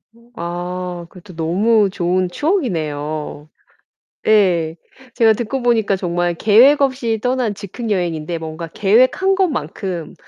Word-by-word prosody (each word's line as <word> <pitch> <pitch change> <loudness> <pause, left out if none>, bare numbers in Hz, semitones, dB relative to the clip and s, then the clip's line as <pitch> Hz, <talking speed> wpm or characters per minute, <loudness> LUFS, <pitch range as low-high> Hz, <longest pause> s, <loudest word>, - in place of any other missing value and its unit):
어 235 +1 -23
아 175 0 -5
그것도 180 0 -14
너무 195 +6 +2
좋은 180 -1 0
추억이네요. 155 - -2 0.8
예. 180 -7 +3 0.4
제가 225 -2 +4
듣고 240 +4 -3
보니까 225 -5 +2
정말 175 -1 -1
계획 245 - +5
없이 255 -5 0
떠난 250 -4 0
즉흥 210 +3 -6
여행인데 170 -3 -2
뭔가 160 +1 -6
계획한 255 - +2
것만큼 185 - -3
190 Hz, 255 characters per minute, -18 LUFS, 170-235 Hz, 0.8 s, 계획